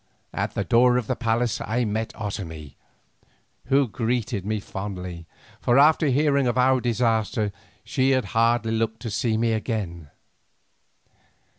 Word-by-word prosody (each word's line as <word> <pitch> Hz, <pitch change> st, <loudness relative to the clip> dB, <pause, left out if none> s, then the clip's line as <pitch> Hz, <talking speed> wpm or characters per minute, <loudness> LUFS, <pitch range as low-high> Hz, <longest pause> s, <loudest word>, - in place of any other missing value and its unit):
At -, -, -3 dB
the -, -, 0 dB
door 125 Hz, +1 st, +4 dB
of 125 Hz, -, -1 dB
the 130 Hz, -, -1 dB
palace 115 Hz, -1 st, 0 dB
I 120 Hz, +3 st, 0 dB
met 110 Hz, +1 st, -2 dB
Otomie, 80 Hz, -9 st, -6 dB, 0.9 s
who 135 Hz, 0 st, +3 dB
greeted 110 Hz, -2 st, -2 dB
me 110 Hz, 0 st, -1 dB
fondly, 90 Hz, -4 st, -6 dB, 0.3 s
for 120 Hz, -, +2 dB
after 155 Hz, +2 st, +5 dB
hearing 140 Hz, 0 st, +2 dB
of 120 Hz, -, 0 dB
our 130 Hz, 0 st, +4 dB
disaster 115 Hz, -2 st, 0 dB, 0.3 s
she 130 Hz, +4 st, +1 dB
had 130 Hz, -1 st, +2 dB
hardly 115 Hz, 0 st, +2 dB
looked 110 Hz, 0 st, -1 dB
to 115 Hz, -, -4 dB
see 110 Hz, +1 st, 0 dB
me 115 Hz, 0 st, +1 dB
again. 100 Hz, -, -3 dB
115 Hz, 140 wpm, -24 LUFS, 105-125 Hz, 0.9 s, after